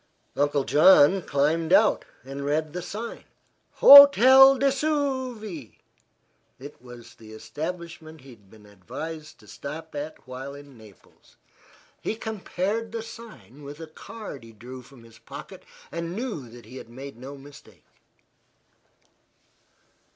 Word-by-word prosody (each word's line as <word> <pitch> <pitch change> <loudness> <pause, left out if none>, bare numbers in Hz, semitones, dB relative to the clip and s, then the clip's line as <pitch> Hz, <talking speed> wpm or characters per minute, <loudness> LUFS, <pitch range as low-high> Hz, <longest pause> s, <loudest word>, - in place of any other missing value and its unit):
Uncle 145 0 0
John 160 +4 +5
climbed 160 +3 -1
out 210 +3 +3 0.2
and 135 +2 -8
read 150 +2 -2
the 180 - -5
sign. 220 +6 -7 0.5
"Hotel 270 -1 +9
du 275 - -1
Vesuve." 260 - -3 0.8
It 140 +1 -13
was 120 -1 -14
the 110 -1 -15
establishment 160 +4 -8
he 135 0 -15
had 105 -5 -20
been 105 0 -18
advised 155 - -9
to 105 - -19
stop 155 +8 -9
at 150 0 -8
while 130 +2 -8
in 145 -1 -14
Naples. 110 -6 -20 0.7
He - - -3
compared 220 0 -4
the 225 -1 -5
sign 225 - -13
with 145 +1 -10
a 165 - -7
card 205 +3 -10
which 125 - -18
he 115 - -15
drew 125 +4 -11
from 125 -1 -18
his 115 0 -18
pocket, - - -11 0.3
and 170 +1 -5
knew 210 - -5
that 120 -1 -14
he 125 +4 -12
had 115 - -11
made 135 +3 -10
no 135 +3 -10
mistake. 135 - -17
150 Hz, 135 wpm, -25 LUFS, 130-205 Hz, 0.8 s, Hotel